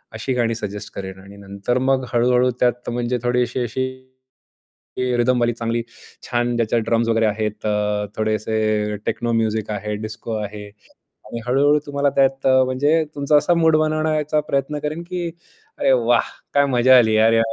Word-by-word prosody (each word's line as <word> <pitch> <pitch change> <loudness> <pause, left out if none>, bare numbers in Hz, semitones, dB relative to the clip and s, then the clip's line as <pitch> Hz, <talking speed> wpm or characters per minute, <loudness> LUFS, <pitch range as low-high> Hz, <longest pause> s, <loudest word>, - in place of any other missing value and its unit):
अशी 120 +4 -2
गाणी 115 -2 0
सजेस्ट 105 -2 -6
करेल 95 -1 -7
आणि 100 +1 -14
नंतर 100 +4 -3
मग 130 0 +1
हळू-हळू 125 +1 +3
त्यात 120 0 0
म्हणजे 120 +1 -1
थोडी 125 0 +1
अशी 120 +1 -4
अशी 125 +3 -2 1.1
की 125 -1 0
रिदम 125 +1 +2
वाली 120 0 +1
चांगली 115 0 -2 0.5
छान 120 0 0
ज्याच्यात 115 0 +1
ड्रम्स 115 0 +1
वगैरे 115 0 +2
आहेत, 110 0 -1 0.6
थोडेसे 110 -1 0
टेक्नो 120 -1 -1
म्युझिक 110 -1 0
आहे, 105 0 -3
डिस्को 110 +2 -6
आहे 105 0 -6 0.6
आणि 120 - -6
हळू-हळू 145 +4 +3
तुम्हाला 140 0 0
त्यात 135 0 +2 0.2
म्हणजे 145 +5 +2
तुमचा 145 +1 +3
असा 150 +4 +2
मूड 160 -1 +4
बनवण्याचा 155 -1 0
प्रयत्न 140 +2 -1
करेन, 150 +3 -4
की 175 -1 -4 0.5
"अरे, - - +2
वाह! 120 -2 +2 0.3
काय 140 0 +5
मजा 130 +2 +6
आली 110 -3 +4
अरे," 115 +1 +4
120 Hz, 155 wpm, -21 LUFS, 110-135 Hz, 1.1 s, मजा